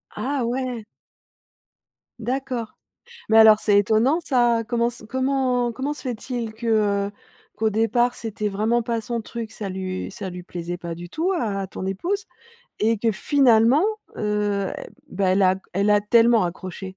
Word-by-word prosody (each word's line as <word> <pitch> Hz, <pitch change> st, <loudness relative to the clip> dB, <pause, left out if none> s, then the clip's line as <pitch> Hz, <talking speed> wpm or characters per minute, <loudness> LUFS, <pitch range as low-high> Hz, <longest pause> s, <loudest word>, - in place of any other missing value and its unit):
Ah 270 Hz, -1 st, -2 dB
ouais! 245 Hz, -2 st, -3 dB, 1.4 s
D'accord. 250 Hz, -1 st, -3 dB, 0.5 s
Mais 220 Hz, -, +5 dB
alors 220 Hz, -1 st, +8 dB
c'est 205 Hz, -1 st, +4 dB
étonnant 225 Hz, -, +3 dB
ça. 240 Hz, -3 st, +2 dB
Comment 235 Hz, 0 st, +1 dB
s 240 Hz, -2 st, -9 dB
comment 260 Hz, -2 st, 0 dB
comment 270 Hz, +5 st, -3 dB
se 295 Hz, -, -9 dB
fait-il 240 Hz, -2 st, -4 dB
que, 230 Hz, +1 st, -7 dB, 0.4 s
heu, -, -, -9 dB, 0.5 s
qu'au 220 Hz, 0 st, +1 dB
départ 235 Hz, +3 st, +2 dB
c'était 215 Hz, -2 st, -3 dB
vraiment 220 Hz, +4 st, +1 dB
pas 230 Hz, -1 st, -2 dB
son 235 Hz, +1 st, -3 dB
truc, 225 Hz, 0 st, -7 dB
ça 205 Hz, -2 st, -5 dB
lu 185 Hz, 0 st, -4 dB
ça 190 Hz, -1 st, -6 dB
lui 180 Hz, 0 st, -8 dB
plaisait 175 Hz, 0 st, -6 dB
pas 170 Hz, -1 st, -5 dB
du 175 Hz, +1 st, -9 dB
tout 340 Hz, +4 st, -1 dB
à 215 Hz, -, -1 dB
à 195 Hz, -, -3 dB
ton 185 Hz, -, -7 dB
épouse 360 Hz, -, -2 dB, 0.5 s
et 225 Hz, +1 st, +2 dB
que 225 Hz, +2 st, +1 dB
finalement, 250 Hz, -, +4 dB, 0.4 s
heu, 205 Hz, -2 st, 0 dB
e -, -, -4 dB, 0.4 s
bah, 190 Hz, 0 st, 0 dB
elle 190 Hz, +2 st, +3 dB
a 185 Hz, -, +5 dB
g -, -, -10 dB
elle 200 Hz, +2 st, +1 dB
a 205 Hz, 0 st, +4 dB
tellement 230 Hz, 0 st, +4 dB
accroché? 185 Hz, +2 st, -6 dB
225 Hz, 170 wpm, -23 LUFS, 200-245 Hz, 1.4 s, alors